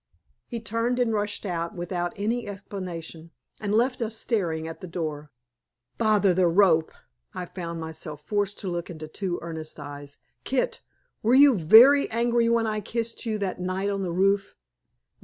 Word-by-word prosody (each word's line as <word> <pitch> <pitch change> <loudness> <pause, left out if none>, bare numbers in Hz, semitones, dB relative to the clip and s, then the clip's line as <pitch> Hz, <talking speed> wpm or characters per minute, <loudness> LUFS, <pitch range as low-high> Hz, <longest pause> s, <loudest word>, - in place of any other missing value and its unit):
He 235 - -4
turned 230 +2 -1
and 245 -3 +1
rushed 205 0 -2
out, 170 -3 -3
without 175 0 -3
any 225 +3 -2
explanation, 180 -5 -7 0.3
and 205 -1 -3
left 250 +2 +1
us 225 -1 -2
staring 170 -10 -1
at 165 - -8
the 185 - -7
door. 155 -4 -5 0.7
"Bother 210 -4 +4
the 180 0 +3
rope!" 170 -3 +4 0.4
I 180 - -4
found 170 -2 -6
myself 160 -2 -7
forced 205 -1 -1
to 195 - -5
look 175 -1 -3
into 155 -2 -7
two 175 +2 -3
earnest 160 -2 -7
eyes. 145 0 -9 0.3
"Kit, 260 -1 -1 0.4
were 235 +4 +3
you 280 0 +8
VERY 230 - +7
angry 235 0 +2
when 230 -1 +2
I 215 -1 -1
kissed 230 +3 -4
you 215 -1 0
that 180 -1 -4
night 185 +2 -1
on 195 -1 -2
the 180 -3 -2
roof?" 195 +2 +1
195 Hz, 165 wpm, -26 LUFS, 170-225 Hz, 0.7 s, you